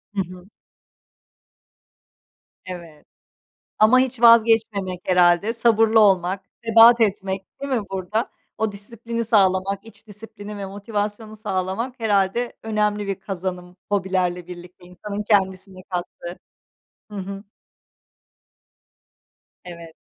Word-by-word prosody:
Hı 195 - +1
hı. 180 +2 -14 2.2
Evet. 170 -5 -10 0.7
Ama 220 +4 +6
hiç 255 -2 0
vazgeçmemek 225 -5 +4
herhâlde. 180 +3 +3
Sabırlı 225 -1 +3
olmak, 190 -2 +3 0.2
sebat 230 +1 +7
etmek 195 -3 0 0.2
değil 280 - -3
mi 235 -5 +1
burada? 195 +5 -2 0.3
O 220 -1 -1
disiplini 230 +3 -5
sağlamak, 195 -2 +2
iç 225 - -17
disiplini 210 0 -10
ve 195 - -5
motivasyonu 210 +2 -4
sağlamak 210 +5 -3
herhâlde 210 +2 +1
önemli 210 -2 -1
bir 195 -1 -4
kazanım 180 -2 -6
hobilerle 185 -3 -1
birlikte 180 0 -12
insanın 200 +3 -6
kendisine 190 -2 0
kattığı. 175 0 -6 0.7
Hı 210 - -8
hı. 195 +1 -6 2.2
Evet. 170 -2 -11
200 Hz, 100 wpm, -22 LUFS, 185-220 Hz, 2.2 s, sebat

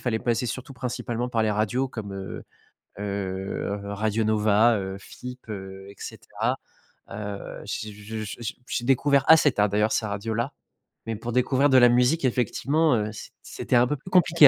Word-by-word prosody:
fallait 115 -3 0
passer 120 +1 0
surtout 130 +3 -5
principalement 125 -1 -3
par 115 -3 +1
les 105 - +2
radios 110 +6 +1
comme, 110 -5 -6
heu 95 0 -6 0.6
heu, 100 0 -3
Radio 105 +2 -1
Nova, 110 +1 +4
heu, 95 0 -4
FIP, 125 +3 -10
heu 95 -1 -7
et 100 - -15
cetera. - - -3 0.5
Heu, 105 -1 -6
j'ai 110 - -4
j 110 +1 -6
j 100 - -6
j'ai 115 -2 -4
j'ai 120 - -2
découvert 135 +1 +3
assez 160 -2 +7
tard, 105 -4 +2
d'ailleurs, 105 +2 +2
ces 110 - +1
radios-là, 110 +6 -2 0.5
mais 115 -1 -2
pour 120 +3 -5
découvrir 130 +3 +3
de 130 - +6
la 120 -1 +8
musique, 125 +6 +3
effectivement, 130 +5 +2
heu, 105 0 -1
c 110 - -9
c'était - - -2
un 120 0 +5
peu 150 - -1
plus 185 - -11
compliqué 170 -4 +7
115 Hz, 180 wpm, -26 LUFS, 105-125 Hz, 0.6 s, la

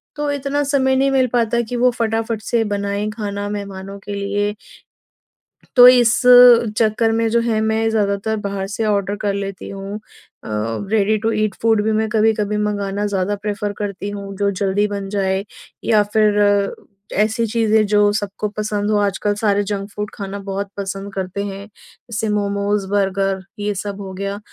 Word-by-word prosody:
तो 295 0 -2
इतना 285 +1 -1
समय 270 -2 +2
नहीं 275 +1 +2
मिल 260 -1 +3
पाता 235 0 +2
कि 245 - -3
वो 250 +1 +4
फटाफट 225 -1 -2
से 230 +1 0
बनाएँ 200 +1 -2
खाना 205 -2 -4
मेहमानों 200 -1 -6
के 205 +1 -7
लिए। 205 +1 -1 1.2
तो 245 0 +10
इस 245 -2 +5 0.6
चक्कर 225 0 +2
में 225 0 +1
जो 235 +1 +3
है 230 -2 0
मैं 220 +1 +1
ज़्यादातर 210 0 0
बाहर 195 -1 -3
से 215 +2 -3
ऑर्डर 200 -1 0
कर 205 -1 -1
लेती 195 -1 -5
हूँ 195 +1 -6 0.5
अ, - - -8 0.4
रेडी 215 0 +2
टू 225 - +3
ईट 215 -2 0
फूड 225 -2 +3
भी 220 - +1
मैं 220 0 +1
कभी-कभी 215 -1 +1
मँगाना 205 -1 -1
ज़्यादा 200 0 -1
प्रेफर 205 0 -2
करती 200 0 -4
हूँ 200 -1 -7
जो 200 0 +1
जल्दी 200 +1 0
बन 200 -1 -4
जाए 195 -1 0 0.4
या 215 -2 +4
फिर 210 -1 +3 0.8
ऐसी 220 +2 +1
चीज़ें 220 -1 +2
जो 205 0 +3
सबको 205 0 -3
पसंद 210 -1 -1
हो 210 - +3
आजकल 205 +1 0
सारे 205 -1 +1
जंक 200 -1 -3
फूड 210 0 -4
खाना 200 0 -6
बहुत 200 0 -4
पसंद 195 0 -5
करते 190 +1 -3
हैं। 200 0 -6 0.4
जैसे 220 0 -2
मोमोज़, 200 0 -1
बर्गर 195 -1 0 0.2
ये 205 0 -2
सब 200 +1 -5
हो 190 -1 -7
गया, 200 +1 -4
205 Hz, 170 wpm, -19 LUFS, 200-220 Hz, 1.2 s, तो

